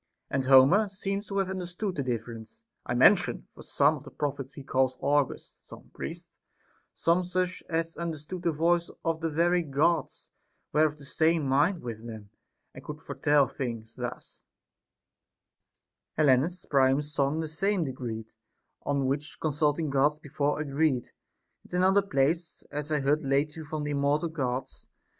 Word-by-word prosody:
And 135 -1 0
Homer 135 +11 +6
seems 195 +1 -3
to 200 - -3
have 195 -1 +1
understood 185 +2 -3
the 150 - -2
difference 115 -3 -5 0.2
I - - -1
mention; - - +4
for - - -13
some 145 +2 +2
of 145 - -13
the 140 - -10
prophets 140 -2 -4
he 140 - -8
calls 130 -1 +1
augurs, 145 0 0
some - - -14
priests, - - -7 0.6
some 170 +2 +2
such 180 0 -2
as 165 0 -1
understood 170 +1 -5
the 170 -1 +1
voice 170 +2 +1 0.2
of 165 -1 0
the 165 - 0
very 175 +3 +2
Gods, 155 +1 0 0.4
were 155 +1 +5
of 150 0 -7
the 145 - -12
same 160 +3 +2
mind 145 +7 +2
with 115 -1 -6
them, 110 -3 -9 0.4
and - - -11
could - - -7
foretell 145 -2 +2
things; 115 -4 -5
thus, - - -7 1.7
Helenus 155 +4 +3
Priam's 140 +2 +2
son 140 +2 +1
the 160 - -2
same 190 +4 0
decreed, 120 -5 -5 0.5
On 140 -1 0
which 140 +3 -2
consulting 150 0 0
Gods 145 +2 +3
before 145 -1 -1
agreed. 145 -3 0 0.5
And - - -17
in 180 - +2
another 195 +2 +5
place, 165 -1 -1
As 150 +1 -4
I 150 -2 +1
heard 145 +3 +2
lately 145 +3 0
from 155 0 -4
th' - - -2
immortal 145 +3 +1
Gods. 130 -5 -4
150 Hz, 155 wpm, -28 LUFS, 135-165 Hz, 1.7 s, Homer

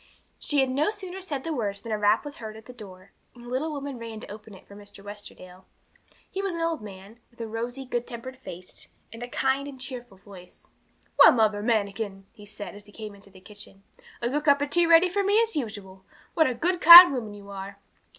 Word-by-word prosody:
She 290 -2 0
had 265 -1 0
no 285 +7 +1
sooner 385 -3 -7
said 290 -8 -5
the 325 - -3
words 205 -7 -3
than 230 +2 -9
a 215 - 0
rap 210 +5 +2
was 290 0 -8
heard 220 -1 -8
at 220 - -15
the 250 - -12
door, 195 -5 -13 0.2
and 240 - -14
the - - -10
little 270 +6 -2
woman 280 -3 -6
ran 225 -1 -8
to - - -9
open 215 0 -11
it - - -17
for 200 - -14
Mr. 205 -1 -14
Westerdale. 190 -3 -12 0.6
He 390 - -5
was 390 -3 -3
an - - -5
old 330 -4 -2
man, 200 +2 -12
with 235 - -29
a 230 - -4
rosy, 240 +4 -5
good 245 -1 -3
tempered 255 +2 -8
face, 180 -6 -10 0.3
and 230 - -10
a 245 - -5
kind 265 +2 -1
and 275 -2 -10
cheerful 245 -6 -9
voice. 185 -2 -14 0.5
'Well, - - +10
Mother 215 -3 +1
Manikin,' 205 -3 -2
he 210 -3 -15
said, 205 0 -9
as 205 0 -13
he - - -16
came 215 -1 -9
into 200 0 -18
the 190 -1 -17
kitchen, 200 0 -13 0.4
'a 235 - 0
good 295 +3 -2
cup 285 -1 +4
of 285 - -5
tea 345 -1 +3
ready 335 +2 +6
for 400 +3 -1
me 405 +2 +3
as 455 -1 0
usual! 205 -7 -6 0.3
What 320 - +3
a 255 - -2
good, 345 +8 -1
kind 345 -1 +12
woman 220 -5 -5
you 200 0 -12
are!' 195 0 -8
230 Hz, 235 wpm, -26 LUFS, 205-285 Hz, 0.6 s, kind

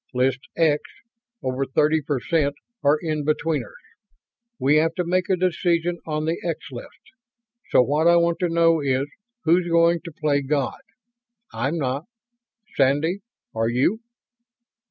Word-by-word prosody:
List 125 +1 +2 0.2
'X' 155 -3 +3 0.6
over 130 +1 -1
thirty 150 +4 +2
percent 145 +1 0 0.3
are 145 +2 +4
in 155 -2 -1
betweeners. 155 -4 -1 0.8
We 145 +3 +3
have 165 +1 +2
to 180 - 0
make 180 +1 0
a 190 - +4
decision 175 -1 0
on 155 0 -2
the 165 +2 -1
'X' 165 -4 -4
list. 120 - -11 0.6
So - - +5
what 150 +5 +1
I 170 - +6
want 170 0 +2
to 180 -2 0
know 165 -1 +3
is, 135 -1 +1 0.4
who's 175 +2 +3
going 170 0 +3
to 170 - -7
play 150 -2 0
God. 140 0 -2 0.7
I'm 130 +9 -1
not. 140 +1 -2 0.7
Sandy, 145 +7 +2 0.3
are 115 0 0
you?" 130 - +1
155 Hz, 140 wpm, -23 LUFS, 140-170 Hz, 0.8 s, I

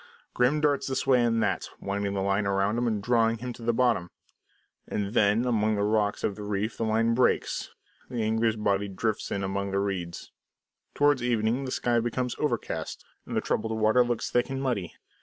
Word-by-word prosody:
Grim 130 +5 +2
darts 145 -2 +1
this 130 - -1
way 125 -2 +4
and 115 -1 +2
that, - - -1
winding 100 0 -2
the 95 - -1
line 100 +1 +1
round 100 +2 +1
him 120 - 0
and 105 -3 -1
drawing 115 0 +2
him 125 +2 -5
to 120 - -13
the 115 +1 +1
bottom. 115 -7 +1 0.8
And 100 0 -3
then, 110 +1 +3
among 110 -3 +2
the 100 - 0
rocks 105 -1 +1
of 100 - 0
the 105 - -9
reef, 105 +2 -2
the 115 - -2
line 115 +1 +2
breaks; 125 +2 +1 0.4
the 120 -3 -2
angler's 110 +1 +1
body 100 -2 0
drifts 105 +2 -2
in 100 - -2
among 100 +1 -2
the 100 0 0
reeds. 95 -4 -4 0.6
Towards 145 -2 +3
evening 120 +2 0
the 130 - -4
sky 120 -2 +1
becomes 120 +1 -2
overcast 125 -7 -3 0.2
and - - -3
the - - +2
troubled 110 0 -1
water 110 +3 +4
looks 120 -1 -2
thick 120 +2 +1
and 135 0 -3
muddy. 120 -10 -2
110 Hz, 195 wpm, -27 LUFS, 100-120 Hz, 0.8 s, way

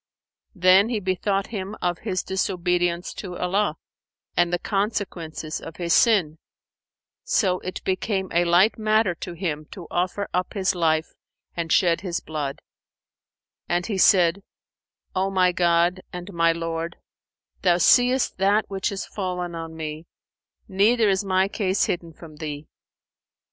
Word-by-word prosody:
[FN#477] 185 - -19
Then 190 +4 +6
he 230 -3 -1
bethought 195 +1 -1
him 200 -2 -5
of 175 -1 -1
his 190 -4 -2
disobedience 180 -2 -1
to 180 -3 -7
Allah, 200 +4 0 0.6
and 175 0 +2
the 175 - +1
consequences 185 -6 -3
of 165 - -9
his 170 -1 0
sin; 180 -10 +3 0.8
so 185 -4 +1
it 185 - -6
became 190 0 -1
a 170 +1 +3
light 175 +6 +4
matter 215 -3 +2
to 175 +1 -7
him 160 -4 -3
to 175 +2 -10
offer 180 +3 -1
up 180 +3 -1
his 190 -1 +1
life 160 -2 0 0.4
and 170 -1 -3
shed 170 -3 +3
his 180 -3 -2
blood; 150 -3 -5 1.1
and 175 0 0
he 205 -4 -2
said, 180 0 +5 0.7
"O 190 +1 0
my 185 -2 +3
God 175 +1 +2
and 180 +2 -8
my 165 0 +3
Lord, 165 0 -4 0.6
Thou 175 -2 +4
seest 245 +5 +3
that 200 +3 +3
which 195 +2 -1
is 195 - -4
fallen 180 -3 -4
on 165 -1 -6
me; 155 +1 -6 0.6
neither 215 +3 +3
is 190 0 +1
my 190 -1 +2
case 200 -1 0
hidden 170 -2 -3
from 155 -1 -13
Thee. 150 -1 -6
180 Hz, 145 wpm, -24 LUFS, 170-195 Hz, 1.1 s, Then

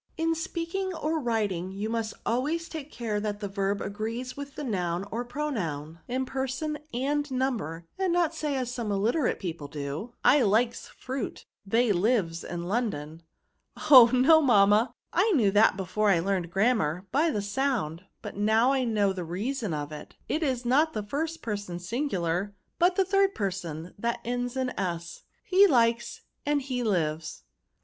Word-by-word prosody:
In 330 0 +1
speaking 340 +3 -3
or 320 0 -1
writing, 210 - -1
you 200 +3 -4
must 225 -1 -2
always 300 +8 0
take 305 -2 -7
care 220 -3 -2
that 205 -1 -3
the 205 - -3
verb 195 0 -1
agrees 225 +5 -4
with 280 0 -8
the 300 - -5
noun 180 -6 -1
or 235 +2 -2
pronoun, 180 - -4
in 260 +2 -1
person 270 +4 -3
and 290 +4 -1
number, 235 - -2
and 380 -2 +1
not 340 -2 +2
say 305 -3 -2
as 250 -2 -2
some 235 -4 -3
illiterate 230 +8 +1
people 165 -6 -5
do, 145 - -5
' - - -46
I 290 - +7
Ukes 230 +1 +2
fruit; 260 -2 -5 0.2
they 230 +2 +3
lives 185 -4 +1
in 170 0 -5
London.' 175 -7 -2 0.3
" - - -31
*^ - - -6
Oh! 250 -4 +11
no, 270 +6 +6
mamma, 215 -2 +4 0.2
I 405 +6 +3
knew 215 -8 +4
that 205 -1 +4
before 205 +3 0
I 180 -4 +4
learned 185 -1 -1
grammar, 190 -4 +1
by 310 +4 +3
the 210 -9 -1
sound; 205 - -1 0.2
but 210 - -6
now, 220 +5 +3
I 270 -1 +1
know 205 -4 +2
the 185 -2 -4
reason 210 +6 -3
of 150 -1 -3
it. 150 -1 -9
It 315 - -1
is 260 -5 -1
not 300 +6 +3
the 215 - -3
first 315 +9 -3
person 205 -5 -4
singular, 190 - -2 0.2
but 355 +1 +4
the 385 - +3
third 390 +1 +2
person, 180 -4 -4
that 235 +2 -1
ends 245 +1 -2
in 260 -1 0
s, 170 -2 -4
— - - -35
^he 395 +1 +7
likes 235 -3 +2 0.2
and 290 0 +1
he 255 -2 -2
lives." 160 -7 -1
230 Hz, 175 wpm, -28 LUFS, 190-275 Hz, 0.3 s, Oh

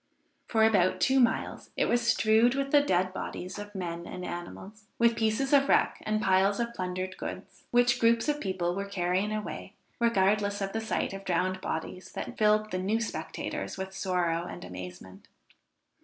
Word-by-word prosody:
For 220 -2 +2
about 195 -5 +3
two 265 0 +3
miles 235 -3 0
it - - +3
was 240 0 +2
strewed 235 +1 +4
with 275 0 -1
the 290 - +6
dead 185 -8 +1
bodies 185 +1 -5
of 205 0 -9
men 170 -2 -4
and 180 0 -6
animals, 195 +5 -8
with 235 0 +4
pieces 225 +5 0
of 275 -1 +5
wreck - - +3
and 215 0 +1
piles 195 +1 +3
of 235 0 -2
plundered 185 -1 -4
goods, - - -8
which 245 0 +3
groups 230 +2 +3
of 295 0 0
people 185 -3 -1
were 200 +2 -3
carrying 185 +2 0
away, 215 0 -5 0.2
regardless 205 -2 +2
of 195 -1 -3
the 225 - -1
sight 220 - -1
of 195 0 -7
drowned 185 0 0
bodies 170 +3 -5
that - - -5
filled 215 0 +2
the 185 - -1
new 205 +5 0
spectators 230 - -4
with 190 0 -5
sorrow 175 -3 0
and - - -8
amazement. 90 +1 -9
200 Hz, 175 wpm, -29 LUFS, 185-230 Hz, 0.2 s, the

